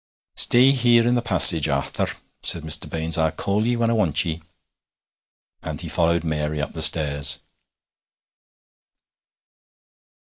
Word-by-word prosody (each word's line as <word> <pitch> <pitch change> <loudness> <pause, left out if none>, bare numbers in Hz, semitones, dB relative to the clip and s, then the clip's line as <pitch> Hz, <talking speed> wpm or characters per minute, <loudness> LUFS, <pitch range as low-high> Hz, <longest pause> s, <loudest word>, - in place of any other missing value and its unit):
'Stay 125 +3 +4
here 120 -3 +1
in 120 - 0
the 120 - -2
passage, 90 -8 +6
Arthur,' 70 0 -5 0.2
said 85 - +1
Mr. 80 -1 0
Baines; 80 0 -2
'I'll 80 -1 -1
call 105 +3 -4
ye 120 - -2
when 115 -1 -2
I - - -1
want 80 -10 0
ye;' 80 0 -7 1.2
and - - -9
he - - -6
followed 85 0 -2
Mary 75 -1 -5
up 75 - -7
the - - -4
stairs. 70 -3 +2
85 Hz, 135 wpm, -19 LUFS, 75-115 Hz, 1.2 s, passage